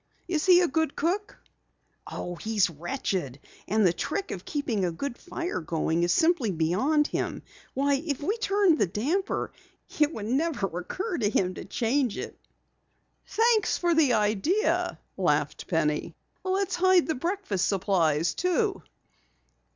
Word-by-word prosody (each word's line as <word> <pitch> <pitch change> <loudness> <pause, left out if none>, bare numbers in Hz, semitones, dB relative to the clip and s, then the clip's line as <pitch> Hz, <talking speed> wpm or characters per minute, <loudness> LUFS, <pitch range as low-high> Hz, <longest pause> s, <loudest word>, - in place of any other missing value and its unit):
Is 330 -1 -1
he 360 -1 +7
a 355 - +3
good 320 0 0
cook?" 400 +6 -1 0.7
"Oh, 175 - -5 0.4
wretched. 175 - -3 0.3
And 215 0 +2
the 175 - +4
trick 395 - -3
of - - -6
keeping 265 - -1
a 175 - +1
good 240 +9 -4
fire 350 - -4
going 160 +1 -1
is 175 0 +2
simply 320 - +3
beyond 195 - +2
him. - - -3 0.3
Why, 280 +1 +2
if 290 -5 -2
we 385 +9 -1
turned 395 -6 +3
the 205 - +3
damper, 295 - -1 0.5
it 300 0 +4
never 250 +1 -1
would 180 -1 -4
occur 370 - -3
to 210 -3 +2
him 185 -3 +1
to - - -8
change 245 -1 0
it." - - -6 0.9
"Thanks 455 -1 +2
for 345 -1 +2
the 305 -6 +4
idea," 220 - +1 0.2
laughed - - 0
Penny. - - 0 0.3
"Let's 380 0 0
hide 370 -1 +5
the 320 - 0
breakfast 310 - -1
supplies, 175 -5 +1
too." 385 +3 0
285 Hz, 145 wpm, -27 LUFS, -, 0.9 s, he